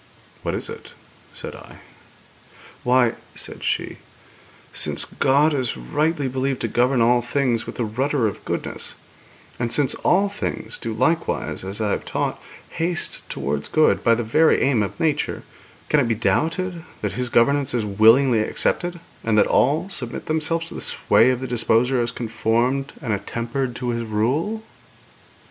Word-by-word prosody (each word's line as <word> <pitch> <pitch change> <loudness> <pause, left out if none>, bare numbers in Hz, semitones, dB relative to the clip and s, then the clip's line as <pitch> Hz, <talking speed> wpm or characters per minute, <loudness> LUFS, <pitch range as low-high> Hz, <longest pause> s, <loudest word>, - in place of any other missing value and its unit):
'What - - -2
is - - -3
it?' - - -8 0.4
said - - -6
I. - - -12 1.1
'Why,' 125 -2 +4 0.2
said - - -8
she, - - -1 0.8
'since - - 0
God 145 +4 +2
is 130 - -1
rightly 145 - 0
believed 130 0 -1
to - - 0
govern 120 +2 +2
all 120 +1 +4
things 120 -2 0
with - - -6
the 120 - -1
rudder 130 +4 0
of 105 - -3
goodness, - - -4 0.6
and 120 -1 -1
since 145 -3 +2
all 195 +3 +2
things 205 +1 -4
do 115 - -4
likewise, 130 - 0
as 95 +3 -5
I 105 -2 0
have - - -1
taught, - - -2 0.3
haste 170 +1 -1
towards 70 +1 -2
good 155 0 +3
by 115 -1 +5
the 120 - -2
very 155 +9 +4
aim 130 -5 +3
of 100 - -3
nature, 150 -2 0 0.4
can 150 - +3
it 130 - +2
be 115 - +1
doubted 165 - 0 0.2
that - - 0
His 125 -1 -2
governance 135 +3 +2
is 115 -3 0
willingly 115 +4 +5
accepted, 175 +10 -1 0.2
and 110 -1 +1
that 105 - +6
all 150 +7 +2
submit 125 -10 -5
themselves 160 +1 0
to - - -9
the - - -6
sway 115 - +4
of 130 -1 0
the 130 - -3
Disposer 120 +1 +2
as 120 - 0
conformed 120 +4 0
and 115 -5 0
attempered 120 +5 -3
to 125 0 -3
His 115 -1 -1
rule?' 135 - -1
125 Hz, 160 wpm, -22 LUFS, 115-145 Hz, 1.1 s, that